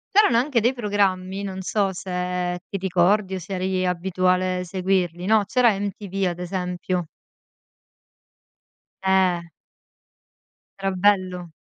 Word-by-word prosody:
C'erano 410 - +6
anche 260 -1 +1
dei 240 +4 +2
programmi, 200 -4 0
non 190 -1 -5
so 195 0 0
se 180 0 -3
ti 195 - -4
ricordi 190 +1 +2
o - - -3
se 190 +3 -7
eri 185 0 -1
abituale 185 0 +1
seguirli, 180 -1 -1
no: 215 0 +4
c'era 240 +2 +4
MTV 195 -1 -3
ad 175 0 -6
esempio. 180 0 -2 2.0
Eh. 190 -2 +3 1.4
Era 195 0 0
bello. 185 -2 +1
185 Hz, 115 wpm, -23 LUFS, 180-200 Hz, 2.0 s, C'erano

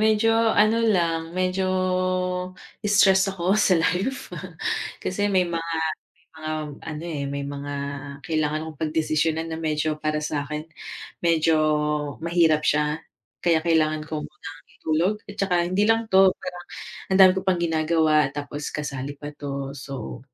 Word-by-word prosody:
medyo 220 +1 +4
ano 225 0 +4
lang, 170 -6 +1
medyo 185 +1 0 1.1
stress 195 -2 +4
ako 190 -1 0
sa 200 -3 +4
life. 190 +10 -1 0.6
Kasi 205 +2 -1
may 190 -2 +3
mga 170 -1 -2 0.5
may 160 +2 -34 0.2
mga, 155 - -2 0.4
ano, 155 +1 -6
eh, 150 -4 -3
may 140 0 -3
mga 145 0 -5 0.5
kailangan 155 -1 0
akong 155 -3 -10
pagdesisyunan 160 +1 0
na 160 - -4
medyo 155 -1 -1
para 155 0 -1
sa'kin 150 +1 -3 0.6
medyo 165 -1 +3 0.6
mahirap 165 -2 +2
siya 150 +1 +2 0.4
kaya 165 -2 +2
kailangan 155 -2 +2
ko 155 0 -4
munang 150 -1 -11 0.2
itulog. 165 +6 +1 0.2
At - - -10
tsaka 195 -2 +1 0.2
hindi 205 +3 +2
lang 225 -1 +2
'to, 190 -1 +6
parang 180 -1 -8 0.5
ang 190 - +4
dami 185 -1 +9
ko - - 0
pang 185 -2 +3
ginagawa 155 -2 +3
tapos 145 0 -5
kasali 145 -1 -4
pa 145 +1 -8
'to. 140 -2 -5
So 135 -2 -7
160 Hz, 140 wpm, -24 LUFS, 150-185 Hz, 1.1 s, dami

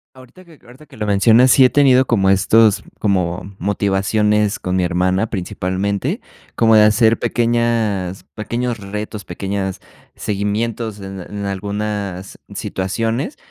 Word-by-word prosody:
Ahorita 130 +8 -16
que 165 -4 -18
ahorita 130 +5 -15
que 135 -5 -17
lo 105 - -2
mencionas, 115 +5 +5
sí 135 - +6
he 125 - +5
tenido 130 -2 +4
como 100 -5 +2
estos 105 +1 +4
como 95 -1 -1
motivaciones 105 +2 +1
con 90 0 -2
mi 90 - +1
hermana 90 +4 0
principalmente, 100 - -2 0.3
como 115 -1 +4
de 105 - +7
hacer 110 +2 +4
pequeñas, 115 -6 0
pequeños 120 +2 -3
retos, 105 -1 -6
pequeñas 95 +1 -4 0.3
seguimientos 105 +1 -3
en 95 0 -8
en 100 +2 -6
algunas 100 -1 -4 0.2
situaciones. 115 - -3
105 Hz, 130 wpm, -18 LUFS, 95-115 Hz, 0.3 s, de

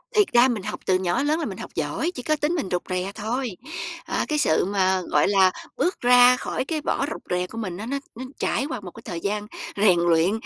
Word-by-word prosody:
Thiệt 420 -2 +5
ra 240 +2 +7
mình 230 -6 -2
học - - -5
từ 185 - +3
nhỏ 175 -2 0
đến 290 - +1
lớn 310 +2 +2
là - - -2
mình - - -5
học - - -7
giỏi, 340 +3 -1
chỉ 250 - -6
có 310 - +2
tính 300 +2 0
mình 305 - -2
rụt 180 -1 0
rè 185 +1 -2
thôi. 240 +5 -2 0.6
À, - - -1
cái 305 - 0
sự 160 - +3
mà, 190 -1 +1
gọi 150 -4 +2
là, 190 -2 +5 0.3
bước 360 - +1
ra 245 0 +7
khỏi - - -3
cái 310 +1 -2
vỏ 275 - 0
rụt - - -6
rè 180 0 0
của 225 - -10
mình 185 -6 -4
á 210 - -6
nó 275 +4 -2 0.2
nó 255 +3 -6
trải 265 - 0
qua 255 - -3
một 190 -3 -9
cái - - -13
thời 170 - -4
gian 205 +3 -2 0.3
rèn 195 -4 +4
luyện 170 +1 +3
210 Hz, 260 wpm, -24 LUFS, 185-265 Hz, 0.6 s, ra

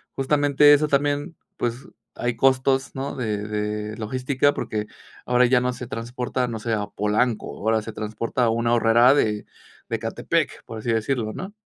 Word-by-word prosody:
justamente 145 +1 +4
eso 150 +1 +3
también, 145 +3 0 0.2
pues, 120 +2 -3 0.3
hay 120 -1 -2
costos, 135 +1 +2
¿no?, 135 +1 -4
de 110 -5 -2
de 105 0 -3
logística, 130 +5 0
porque 105 -1 -3 0.4
ahora 125 0 +4
ya 125 0 +3
no 125 0 0
se 125 -1 -7
transporta, 125 +1 -3
no 110 -1 -4
sé, 115 +1 -2
a 105 -1 -1
Polanco, 105 +3 -1
ahora 110 +1 +1
se 110 0 -8
transporta 110 +4 -2
a - - +3
un 115 +1 0
Aurrera 120 +2 +5
de 105 -7 0 0.4
de - - 0
Ecatepec, - - -2
por 115 - -8
así 120 - -2
decirlo 110 -1 -1
¿no? 190 +3 -7
120 Hz, 170 wpm, -23 LUFS, 110-135 Hz, 0.4 s, Aurrera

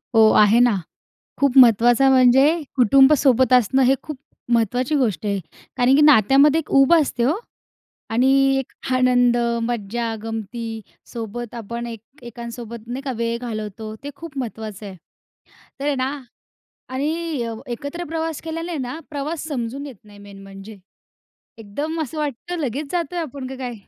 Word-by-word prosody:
हो. 220 -1 +7
आहे 215 +3 +5
ना. 245 -4 +4 0.7
खूप 280 -1 +2
महत्वाचं 240 +2 +6
म्हणजे 260 +1 +5 0.3
कुटुंब 265 +4 +6
सोबत 260 -2 +3
असणं 250 +2 +4
हे 265 +2 +4
खूप 305 -2 -7 0.4
महत्त्वाची 245 +5 +1
गोष्ट 225 -6 -1
आहे. 200 -1 0 0.4
कारण 250 +2 +3
की - - +4
नात्यामध्ये 280 +3 +5
एक 310 - -14
उब 275 +3 +5
असते 285 -7 +1
हो 270 +6 +2 0.8
आणि 245 +4 +2 0.3
एक 270 - -7 0.2
आनंद, 245 -1 +3 0.3
मज्जा, 230 0 -3
गमती 225 0 -5 0.3
सोबत 235 +1 -6
आपण 235 +1 -6
एक 230 +4 -12
एकांसोबत 235 -1 -9
नाही 250 +3 -5
का 275 - -3
वेळ 235 0 -1
घालवतो 215 -2 -6
ते 285 - -5
खूप 325 -3 -10
महत्त्वाचं 220 -4 -6
आहे. 190 -2 -8 0.8
तर 280 - -4
आहे 290 -1 +1
ना 260 +1 -1 0.8
आणि 275 +4 -2 0.6
एकत्र 285 +8 -6
प्रवास 325 -1 -3
केल्यानी 330 +1 -5
आहे 325 - -3
ना 260 +4 -5
प्रवास 295 +2 -4
समजून 270 +1 -4
येत 265 -5 -10
नाही 205 -1 -16
मेन 200 -1 -13
म्हणजे. 195 +2 -11 0.8
एकदम 290 +10 -4
असं 310 +1 -5
वाटतं 305 +4 -4
लगेच 280 +1 -3
जातोय 345 -1 -2
आपण 280 -5 -6
का 265 - -7
काय? 250 -2 -5
245 Hz, 155 wpm, -21 LUFS, 225-280 Hz, 0.8 s, हो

